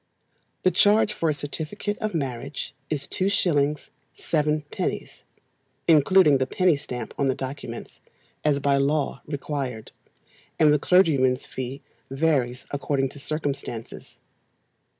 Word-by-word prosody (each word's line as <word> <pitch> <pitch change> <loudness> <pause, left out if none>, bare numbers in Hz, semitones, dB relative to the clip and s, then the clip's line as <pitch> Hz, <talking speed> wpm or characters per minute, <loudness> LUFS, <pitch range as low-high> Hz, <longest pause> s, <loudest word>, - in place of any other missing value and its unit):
The 185 - +4
charge 210 +4 +4
for 165 - 0
a - - +2
certificate 160 +8 -4
of 215 -4 -2
marriage 135 -1 -4 0.2
is 145 -2 -2
2s. 150 -7 +1 0.3
7d., 150 -1 -2 0.7
including 160 -1 +6
the 130 - 0
penny 180 +2 +3
stamp 125 -4 -6
on 140 - +2
the 130 - +1
documents, 130 -3 -7 0.4
as 145 -2 +2
by 140 0 +2
law 140 +2 0
required, 140 -6 -4 0.7
and 150 -2 +5
the 150 - +3
clergyman's 140 -8 +3
fee 130 +1 -6 0.3
varies 135 -3 0
according 140 -1 0
to 145 - -12
circumstances. 140 -6 -5
145 Hz, 115 wpm, -25 LUFS, 135-160 Hz, 0.7 s, including